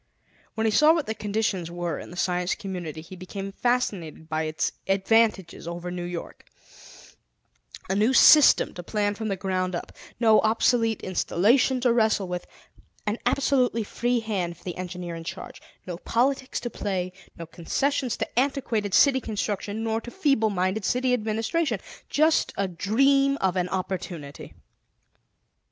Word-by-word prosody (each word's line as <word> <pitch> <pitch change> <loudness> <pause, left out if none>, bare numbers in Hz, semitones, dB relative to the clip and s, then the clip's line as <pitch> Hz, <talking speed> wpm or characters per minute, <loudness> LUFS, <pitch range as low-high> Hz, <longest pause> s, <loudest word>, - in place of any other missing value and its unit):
When 220 0 -1
he 220 - +3
saw 300 +9 +5
what 320 -4 -1
the 220 - -2
conditions 205 -5 -2
were 175 -2 -3
in - - -9
the 175 - -10
Science 180 0 0
Community, 175 -5 -6
he 170 +4 -11
became 195 +2 -7
fascinated 195 -10 -2
by 155 0 -1
its 155 0 -1 0.2
advantages 195 -3 +1
over 175 +1 -5
New 175 -1 -4
York; 175 -1 -7 1.4
a - - -1
new 210 +5 +3
system 295 +2 +7
to 175 - -7
plan 205 +3 -1
from 220 +1 -5
the 195 - -1
ground 185 -1 -2
up; - - -6 0.3
no 220 -2 +5
obsolete 225 0 +2
installation 225 +8 +2
to 245 -2 +3
wrestle 220 -4 +2
with; 180 0 -5 0.6
an 210 +2 -1
absolutely 255 -3 +2
free 240 +3 -1
hand 185 -6 -3
for - - -22
the 180 - -5
engineer 180 -1 -6
in 165 - -7
charge; - - -8 0.2
no 175 -2 -5
politics 260 +7 0
to 240 - -4
play; 185 -4 -3 0.2
no 170 - -7
concessions 250 - -1
to - - -1
antiquated 240 -7 0
city 270 -2 +5
construction, 210 0 -3
nor 225 0 -1
to 240 - -8
feeble 275 - +1
minded 190 +2 -1
city 250 +4 +1
administration 225 - -1 0.3
just 310 +2 +2
a 200 - 0
dream 275 +10 +2
of 190 -7 0
an 180 -1 0
opportunity. 180 -5 -5
205 Hz, 155 wpm, -25 LUFS, 180-240 Hz, 1.4 s, system